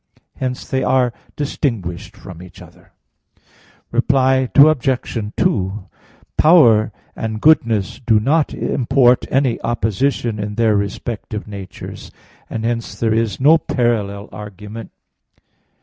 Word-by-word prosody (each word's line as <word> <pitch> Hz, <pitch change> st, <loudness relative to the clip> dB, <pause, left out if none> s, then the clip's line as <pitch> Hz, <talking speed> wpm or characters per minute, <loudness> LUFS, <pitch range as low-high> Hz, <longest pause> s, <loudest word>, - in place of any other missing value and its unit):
Hence 125 Hz, -1 st, -4 dB
they 130 Hz, -1 st, -1 dB
are 125 Hz, -2 st, +2 dB, 0.2 s
distinguished 105 Hz, -, -3 dB
from 90 Hz, -5 st, -11 dB
each 90 Hz, -2 st, -13 dB
other. -, -, -17 dB, 1.0 s
Reply 130 Hz, -1 st, +2 dB
Obj. 130 Hz, -7 st, +3 dB
2: 95 Hz, 0 st, -1 dB, 0.5 s
Power 120 Hz, -11 st, +5 dB, 0.2 s
and 110 Hz, -1 st, -4 dB
goodness 115 Hz, -9 st, +2 dB
do 110 Hz, -2 st, +3 dB
not 145 Hz, +7 st, +1 dB
import 125 Hz, -1 st, +2 dB
any 130 Hz, -2 st, +1 dB
opposition 115 Hz, 0 st, -1 dB
in 105 Hz, 0 st, -4 dB
their 115 Hz, -1 st, +2 dB
respective 105 Hz, +1 st, -4 dB
natures; 100 Hz, -3 st, -9 dB, 0.4 s
and 110 Hz, 0 st, -4 dB
hence 115 Hz, -1 st, -3 dB
there 110 Hz, -1 st, +1 dB
is 110 Hz, -3 st, -1 dB
no 155 Hz, +5 st, +5 dB
parallel 105 Hz, -7 st, -1 dB
argument. 105 Hz, +2 st, -9 dB
115 Hz, 110 wpm, -18 LUFS, 105-130 Hz, 1.0 s, Power